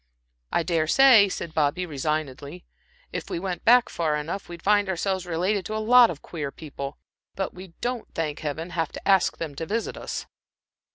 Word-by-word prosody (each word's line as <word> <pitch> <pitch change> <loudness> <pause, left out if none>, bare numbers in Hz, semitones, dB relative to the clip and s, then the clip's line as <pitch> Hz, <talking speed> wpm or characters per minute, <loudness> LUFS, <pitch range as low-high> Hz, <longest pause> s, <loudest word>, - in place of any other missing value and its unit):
"I - - +1
dare 165 -1 0
say," 235 -2 +7
said 170 -3 -5
Bobby, 160 +4 +1
resignedly, 150 +1 -4 0.5
"if - - -5
we - - -2
went 180 -1 -3 0.3
far 155 -3 -1
enough 160 +6 -4
back, - - -21
we'd 170 -1 -9
find 205 -1 +3
ourselves 190 0 -1
related 185 +4 0
to 215 - -4
a - - 0
lot 245 -2 +9
of 150 - -7
queer 150 -5 -5
people. 140 -2 -7 0.4
But 195 - -3
we 180 -1 -11
don't, 245 -1 -2
thank 155 -3 -2
Heaven! 155 +3 -4
have 165 -3 -1
to - - -8
ask 195 -2 +4
them 160 -3 -5
to 165 +4 -5
visit 225 +2 -2
us." - - -5
170 Hz, 185 wpm, -25 LUFS, 155-195 Hz, 0.5 s, lot